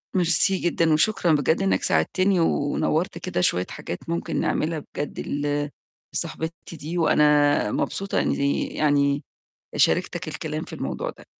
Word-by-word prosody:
ميرسي 185 +3 +3
جدًا 165 -2 +2
وشكرًا 175 +1 +2
بجد 150 +2 +2
إنّك 95 -1 +1
ساعدتني 185 - +2
ونوَّرت 160 +2 0
كده 90 - -2
شوية 90 0 +2
حاجات 85 - -6
ممكن 170 -1 -2
نعملها 160 +1 0 0.2
بجد 145 - -4
ل 145 0 -1 0.4
لصاحبتي 165 +1 -5
دي 160 +3 -5
وأنا 150 -7 +4
مبسوطة 195 0 -1
إنّي 140 0 0
يعني 145 -1 +1 0.5
شاركتك - - +1
الكلام - - -4
في - - -11
الموضوع - - -3
ده. - - -12
155 Hz, 130 wpm, -24 LUFS, 145-170 Hz, 0.5 s, وأنا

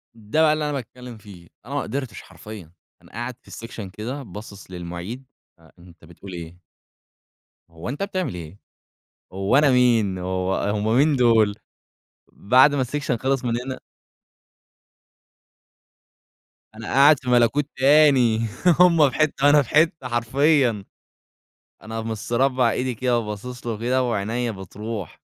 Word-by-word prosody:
ده 110 +8 -1
بقى 155 -1 +5
اللي 155 0 -2
أنا 150 - -2
باتكلم 125 -2 -8
فيه، 95 -5 -14 0.2
أنا 140 - -8
ما 145 - 0
أقدرتش 130 -2 -5
حرفيًا 105 -7 -12 0.3
أنا - - -20
قاعد 120 +2 -5
في - - -17 0.2
section 105 -6 -8
كده 130 +6 -6
باصص 100 -2 -11
للمُعيد، 90 +8 -7 0.3
آآ 80 - -21
أنت 85 -2 -17
بتقول 85 +3 -12
إيه؟ 85 0 -9 1.1
هو 80 +6 -8
أنت 145 +9 -4
بتعمل 185 - -3
إيه، 85 +2 -9 0.7
هو 95 +7 0
أنا 145 -1 +5
مين 115 -7 +2
وهو 95 +1 -2 0.2
هم 110 +3 0
مين 145 +1 +3
دول. 115 -4 +3 0.8
بعد 130 +7 +4
ما 135 - +1
الsection 135 0 -2
خلص 130 +1 -1
من 115 - 0
هنا 130 -1 -6 3.0
أنا 110 0 -9
قاعد 140 +1 +6
في 125 - -6
ملكوت 125 +4 +3
تاني 130 -5 +4 0.3
هم 165 -5 +6
في - - -9
حتة 145 -2 +2
أنا 150 0 +6
في 130 - -7
حتة 155 -3 +2
حرفيwا. 120 -1 +1 1.0
أنا 110 +1 -6
مستربع 120 +3 0
إيدي 125 0 -2
كده 125 0 0
وباصص 115 +3 -7
له 115 - -1
وكده 125 +4 0
وعينيا 115 +1 -2
بتروح 100 0 -8
120 Hz, 140 wpm, -22 LUFS, 105-135 Hz, 3.0 s, قاعد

